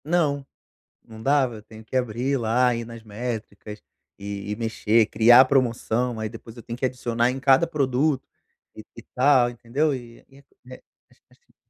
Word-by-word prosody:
Não, 150 -4 0 0.6
não 110 -1 -13
dava 135 -2 +2
eu 105 - -12
tenho 110 +1 -14
que 120 - -5
abrir, 125 +3 -1
lá, 120 +2 +2
ir 115 0 -4
nas 115 0 -11
métricas 110 -1 -7 0.4
e 100 0 -6
e - - -4
mexer, 115 -1 +1
criar 120 +5 +6
promoção, 120 -2 0
aí 110 - -3
depois 115 0 -12
eu 120 - -10
tenho 115 +1 -7
que 130 - -4
adicionar 120 -2 0
em 130 +1 -5
cada 135 +4 +4
produto, 140 -2 0 0.5
e - - -10
e - - -10
tal, 130 -1 +4
entendeu? 130 +6 -1
E 120 -2 -10
e 135 - -19
é 140 - -21 0.7
é - - -24
chatinho. - - -31
120 Hz, 175 wpm, -24 LUFS, 115-135 Hz, 0.7 s, criar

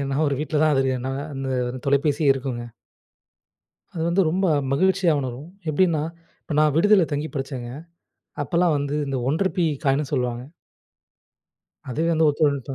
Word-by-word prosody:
ஏன்னா 135 0 -2
ஒரு 140 - 0
வீட்ல 155 0 -1
தான் 155 - +4
அது 135 - +3
தெரியும். 130 -2 -1
ன்னா 130 - -2 0.2
அந்த 130 -2 -2
தொலைபேசியே 140 +1 +2
இருக்குங்க! 130 -3 -4 1.3
அது 160 - -3
வந்து 185 +3 +3
ரொம்ப 190 +2 +1 0.3
மகிழ்ச்சியா 185 +2 +3
உணரும். 130 +4 -6 0.2
எப்டின்னா 160 -2 +2 0.4
இப்ப 155 - -5
நான் 150 -2 +3
விடுதில 205 +1 +5
தங்கி 150 +2 -2
படிச்சேங்க. 130 -3 -4 0.7
அப்பலாம் 170 -2 +2
வந்து 145 +1 -2
இந்த 135 - -1
1 160 - -1
ருப்பீ 180 -3 0 0.2
காயின்னு 135 +1 +1
சொல்லுவாங்க. 125 -2 -1 1.5
அதுவே 160 +7 0
வந்து 160 -1 +3
ஒத்துழைப்பு 145 -3 +1
தா 135 - -3
145 Hz, 150 wpm, -23 LUFS, 135-160 Hz, 1.5 s, விடுதில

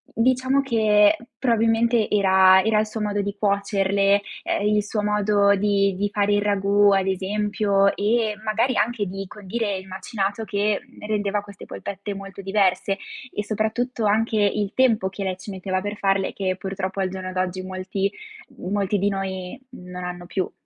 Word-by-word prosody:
diciamo 260 +3 +2
che 215 0 +4 0.2
probabilmente 230 -1 +2
era 190 -2 +5
era 220 0 +1
il 215 - +1
suo 220 +1 -6
modo 205 -1 0
di 200 0 -4
cuocerle, 200 0 +2 0.2
ehm, 205 - 0
il 210 -1 +2
suo 210 0 -2
modo 205 -1 +3
di 200 -1 +1
di 205 +1 0
fare 205 0 +1
il 205 - +2
ragù, 205 0 +3
ad 195 -1 +2
esempio, 200 +1 +1
e 215 +1 +1
magari 225 +4 +1
anche 225 -2 0
di 195 +1 -5
condire 205 0 -3
il 190 0 -9
macinato 200 +2 -3
che 205 0 0 0.2
rendeva 205 -1 -1
queste 200 -1 -12
polpette 200 +1 -6
molto 195 0 -9
diverse 195 0 +1 0.4
e 210 - -2
soprattutto 220 +2 -2
anche 220 +2 +1
il 205 0 +1
tempo 230 -7 +3
che 195 +1 -6
lei 185 -1 -2
ci 190 +2 -10
metteva 185 0 -2
per 205 +1 -4
farle 195 -1 0
che 185 -1 -2
purtroppo 190 +1 -4
al 190 -1 0
giorno 185 0 -6
d'oggi 185 0 -2
molti 190 +1 -3 0.5
molti 200 +2 -1
di 200 - +1
noi 190 +2 -4
non 180 -6 -9
hanno 175 0 -6
più. 185 +1 -3
200 Hz, 165 wpm, -23 LUFS, 195-210 Hz, 0.5 s, era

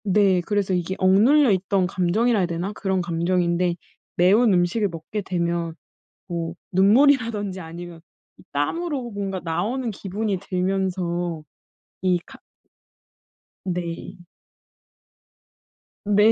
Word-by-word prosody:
네. 195 -2 +3
그래서 205 -3 0
이게 180 +1 -1
억눌려 225 +9 +5
있던 190 0 +1
감정이라 205 +6 +1
해야 185 - +2
되나 175 +3 -3
그런 190 -3 -1
감정인데 175 +1 0 0.4
매운 205 +6 +5
음식을 180 +4 +2
먹게 170 +5 -5
되면 170 -3 -2 0.5
뭐 170 -2 -4 0.2
눈물이라든지 210 -1 +3
아니면 170 0 -9 0.4
이 - - -16
땀으로 270 - -2
뭔가 195 -2 -3
나오는 220 +10 -1
기분이 200 0 -3
들면서 180 -3 -2 0.6
이 185 -1 +3
캅 - - -13 1.3
네. 175 -2 -4 1.9
네. 210 +2 +5
185 Hz, 230 characters per minute, -23 LUFS, 175-210 Hz, 1.9 s, 억눌려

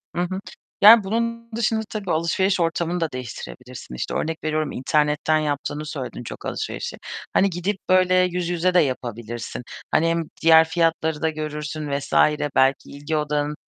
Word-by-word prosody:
Hı 175 - 0
hı, 185 +2 -2 0.4
yani 215 +1 +9
bunun 230 +3 -2
dışında 225 -1 +1
tabii 200 -4 -4
alışveriş 180 +4 +1
ortamını 170 +1 0
da 165 -3 -1
değiştirebilirsin. 125 - -8
İşte, - - -4
örnek 160 0 -3
veriyorum: 155 -1 -1
İnternetten 150 +3 +1
yaptığını 145 0 -3
söyledin 135 -5 -6
çok - - -9
alışverişi. - - -4 0.4
Hani, 200 - +4
gidip 185 +3 -2
böyle 185 0 +4
yüz 180 -1 +1
yüze 175 +1 +1
de 180 - +6
yapabilirsin. 120 -3 -3 0.3
Hani, 165 - +3
hem 165 0 +1 0.2
diğer 160 0 +7
fiyatları 160 -2 0
da 160 - +2
görürsün 150 0 -5
vs. 140 0 -3 0.4
belki 135 +1 +2
ilgi 145 +2 -3
odağın, 150 0 -1
160 Hz, 155 wpm, -23 LUFS, 150-180 Hz, 0.4 s, yani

